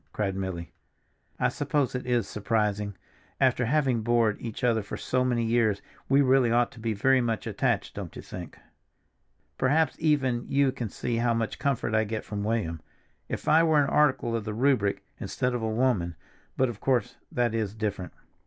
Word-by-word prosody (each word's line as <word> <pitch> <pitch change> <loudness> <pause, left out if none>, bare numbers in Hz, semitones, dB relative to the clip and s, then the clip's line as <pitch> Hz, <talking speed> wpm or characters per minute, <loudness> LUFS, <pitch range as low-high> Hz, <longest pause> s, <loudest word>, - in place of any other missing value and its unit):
cried 100 -3 -1
Milly. 95 -3 -4 0.7
"I - - +3
suppose 145 -4 0
it 125 0 -4
is 120 -4 +1
surprising. 105 -2 -1 0.4
After 130 -2 +3
having 130 -4 +2
bored 115 -2 +2
each 115 0 -6
other 115 -2 +3
for 100 - -6
so 130 0 0
many 120 -2 +1
years, 110 -3 +2 0.3
we 140 +1 +5
really 130 -2 +4
ought 120 0 +2
to 115 - -14
be 110 0 -1
very 130 +6 +3
much 115 -2 -1
attached, - - -1
don't - - -7
you - - -8
think? - - -8 1.0
Perhaps 155 +5 +2
even 135 -6 +1
you 140 -1 +3
can 125 -4 -4
see 115 +4 -3
how 120 0 +2
much 115 -1 -2
comfort 135 -5 0
I 110 0 +3
get 110 0 -4
from 100 -1 -4
William. 105 -8 -1 0.5
If - - -5
I 155 +2 +6
were 160 -2 +4
an 140 - -2
article 130 -5 +2
of 115 - -2
the 105 0 -4
Rubric, 115 -5 +2 0.2
instead 125 0 -1
of 120 - -2
a 110 - -1
woman—but 110 0 -1
of 115 -4 -6
course, 125 -2 0
that 120 -2 +1
is 110 -2 -2
different." 105 -4 -3
120 Hz, 180 wpm, -27 LUFS, 105-130 Hz, 1.0 s, I